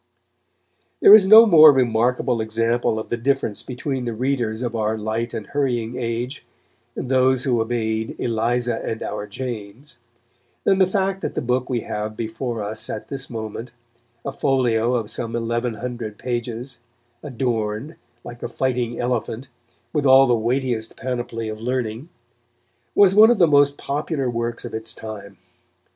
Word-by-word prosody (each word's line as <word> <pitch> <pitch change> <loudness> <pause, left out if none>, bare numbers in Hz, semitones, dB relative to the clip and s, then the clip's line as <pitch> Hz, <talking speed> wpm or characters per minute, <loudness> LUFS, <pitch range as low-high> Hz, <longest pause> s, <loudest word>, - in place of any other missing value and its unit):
There 200 - +8
is 205 -3 +8
no 220 +3 +10
more 155 -7 +9
remarkable 125 -1 +1
example 115 +1 0
of 110 - -5
the 120 - -1
difference 130 -3 -1
between 130 0 -4
the 120 -2 -3
readers 120 -2 -1
of 120 -1 -3
our 110 0 -1
light 110 +2 -3
and 105 - -5
hurrying 125 -5 -2
age 120 +2 -4 0.5
and - - -4
those 130 0 +2
who 120 -4 +1
obeyed 110 -1 -2
"Eliza 120 +1 -1
and 110 - -4
our 105 0 -5
James," 120 +3 -7 0.6
than 195 - +3
the 190 - +5
fact 190 0 -1
that - - -4
the - - -1
book 125 +1 -1
we 120 -3 -1
have 105 0 -5
before 115 0 -4
us 110 +2 -4
at 110 - -6
this 135 -1 -5
moment, 115 +1 -6 0.6
a 140 - -2
folio 125 -3 +1
of 110 -3 -3
some 115 -1 -4
eleven 115 0 -2
hundred 115 -2 -6
pages, 120 0 -5 0.4
adorned, 120 0 -3 0.3
like 120 0 -10
a - - -4
fighting 125 -1 -2
elephant, 120 +1 -3 0.4
with 145 -2 +1
all 135 +1 +7
the 125 - +2
weightiest 120 0 -1
panoply 120 -3 -4
of 110 0 -6
learning, 125 +3 -3 0.9
was 200 -2 +6
one 215 +2 +8
of 240 - +3
the 175 - +6
most 145 -1 +4
popular 145 -1 -2
works 120 -1 -3
of - - -8
its 110 0 -5
time. 105 -3 -9
120 Hz, 155 wpm, -22 LUFS, 110-130 Hz, 0.9 s, no